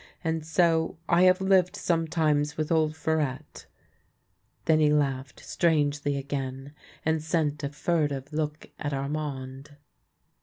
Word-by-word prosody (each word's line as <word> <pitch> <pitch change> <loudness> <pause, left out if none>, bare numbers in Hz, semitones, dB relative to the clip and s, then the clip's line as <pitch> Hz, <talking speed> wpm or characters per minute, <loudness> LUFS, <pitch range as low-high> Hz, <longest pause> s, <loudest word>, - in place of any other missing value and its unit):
And 160 -1 -1
so 165 0 +2
I 175 +2 +5
have 185 +1 +5
lived 190 -2 +3
sometimes 155 -3 0
with 155 0 -2
old 155 -1 +2
Farette." 155 -5 -2 1.0
Then 155 -1 +4
he 150 -1 +4
laughed 135 -3 0
strangely 145 -3 +1
again, 135 0 -5 0.3
and 160 0 +1
sent 155 -2 -1
a 140 - -1
furtive 145 -2 -1
look 150 0 -3
at 145 -1 -3
Armand. 140 0 -5
150 Hz, 120 wpm, -27 LUFS, 140-160 Hz, 1.0 s, I